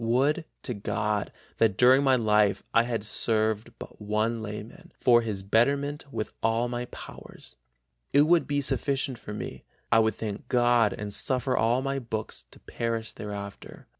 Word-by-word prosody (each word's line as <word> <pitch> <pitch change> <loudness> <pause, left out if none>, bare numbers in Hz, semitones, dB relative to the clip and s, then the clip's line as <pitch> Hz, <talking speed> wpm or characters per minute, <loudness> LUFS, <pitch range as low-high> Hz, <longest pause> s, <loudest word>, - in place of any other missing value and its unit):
Would 135 +8 +2 0.2
to 125 - -3
God 105 0 -2 0.3
that 105 -4 +3
during 130 +3 +6
my 135 -1 +5
life 105 -3 +2
I 115 - +6
had 115 -3 -3
served 110 0 0
but - - -11
one 110 +2 0
layman 105 +1 -8
for 120 -1 +5
his 105 -4 -4
betterment 140 +7 +1
with 110 - -4
all 115 +2 +1
my 120 0 -3
powers; - - -12 0.6
it 140 +1 +6
would 170 +2 +3
be 145 0 0
sufficient 135 -2 -1
for 105 - -7
me, - - -6 0.3
I 115 - +6
would 110 -2 +2
thank 105 -3 -5
God 120 -3 +3
and 105 -1 -6
suffer 130 +2 +1
all 120 +3 +2
my 135 0 -1
books 110 -3 -5
to - - -17
perish 115 -1 -3
thereafter.... 100 -1 -8
115 Hz, 165 wpm, -27 LUFS, 105-130 Hz, 0.6 s, during